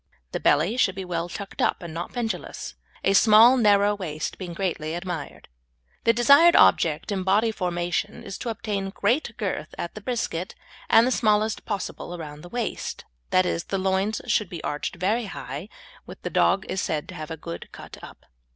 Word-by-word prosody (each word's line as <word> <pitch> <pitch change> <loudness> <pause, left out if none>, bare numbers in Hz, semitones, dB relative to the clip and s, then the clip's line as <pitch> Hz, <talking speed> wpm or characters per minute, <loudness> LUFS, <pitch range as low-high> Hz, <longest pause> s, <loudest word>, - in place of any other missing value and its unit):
The - - -2
belly 225 +7 +2
should 190 -6 +2
be 190 -1 -5
well 175 -1 -3
tucked 200 +2 -6
up - - +1
and 170 -2 -7
not 170 +2 -5
pendulous, 235 -3 -4 0.3
a 195 - +3
small 220 +4 +7
narrow 205 -3 +4
waist 160 -6 -5
being 180 -3 -6
greatly 165 -4 -2
admired. 175 -4 -6 0.6
The 230 - +6
desired 280 +9 +6
object 160 +6 +4
in 195 -2 -1
body 205 +4 +2
formation 175 -4 -2
is 200 0 -7
to 240 - -4
obtain 205 -3 -3
great 230 +5 0
girth 195 -8 -4
at 170 - -5
the 215 - -9
brisket, 205 -6 -3 0.3
and 225 - +7
the 255 - +1
smallest 215 -2 +1
possible 195 -3 -4
around 150 -3 -8
the 175 - -11
waist, 240 0 -4 0.2
that 185 0 +3
is, 170 -1 -2
the 195 - -2
loins 190 +3 0
should 210 -5 +1
be 170 -3 -7
arched 145 0 -3
very 210 +7 0
high, 150 -1 -7 0.4
when - - -10
the - - -3
dog 195 - +3
is 190 - -2
said 150 -2 -2
to - - -7
have 155 0 -7
a 160 - -5
good 85 - -8
"cut - - -11
up." - - -12
195 Hz, 190 wpm, -25 LUFS, 170-220 Hz, 0.6 s, small